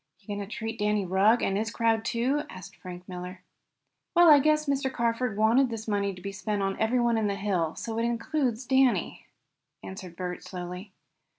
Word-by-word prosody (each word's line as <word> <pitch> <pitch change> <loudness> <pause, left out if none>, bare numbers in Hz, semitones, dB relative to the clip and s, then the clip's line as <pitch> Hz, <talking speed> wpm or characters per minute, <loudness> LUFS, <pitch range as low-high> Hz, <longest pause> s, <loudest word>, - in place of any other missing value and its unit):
"Going 205 0 -4
to 200 - -5
treat 225 +1 -5
Danny 210 -1 +1
Rugg, 195 +6 +3
and 195 - +1
his 215 +2 -1
crowd, 230 -1 +1
too?" 245 +6 0
asked 185 - -10
Frank 180 -1 -9
Miller. 180 0 -7 0.7
"Well, 345 -2 +8
I 290 - +9
guess 305 +2 +2
Mr. 275 -2 0
Carford 235 -2 -1
wanted 235 +5 +4
this 225 -1 -6
money 200 -2 0
to 180 - -12
be 200 - -4
spent 205 0 -2
on 195 0 -1
everyone 235 0 +2
on 215 - +1
the 200 - -1
hill, 190 -5 -1
so 225 -1 -4
it - - 0
includes 240 +1 -1
Danny," 265 -1 +2 0.6
answered 185 -2 -8
Bert 180 0 -5
slowly. 180 +2 -7
220 Hz, 185 wpm, -28 LUFS, 195-240 Hz, 0.7 s, I